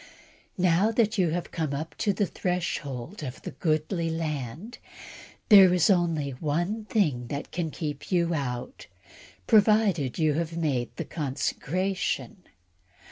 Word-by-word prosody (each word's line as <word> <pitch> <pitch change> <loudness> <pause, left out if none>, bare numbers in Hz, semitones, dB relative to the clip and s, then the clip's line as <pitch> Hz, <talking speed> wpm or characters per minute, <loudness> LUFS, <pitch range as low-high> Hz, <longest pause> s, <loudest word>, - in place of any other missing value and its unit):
Now 180 +3 +3
that 225 -1 +1
you 180 -3 +3
have 175 +2 -3
come 155 -4 -2
up 155 +3 -5
to 210 - +2
the 200 +1 0
threshhold 170 - -3
of 130 -3 -7
the - - -5
goodly 165 +1 -1
land, 160 - -4 0.7
there 195 -4 +9
is 180 +3 +4
only 165 -6 +1
one 170 - -2
thing 150 - 0
which 140 +3 -5
can 170 -2 -2
keep 150 +1 -6
you 170 -2 +2
out, 135 - -4 0.6
provided 210 - +3
you 155 -2 +2
have 165 +2 -2
made 135 -7 0
the - - -3
needed - - -20
consecration. 180 - -2
165 Hz, 135 wpm, -27 LUFS, 145-190 Hz, 0.7 s, there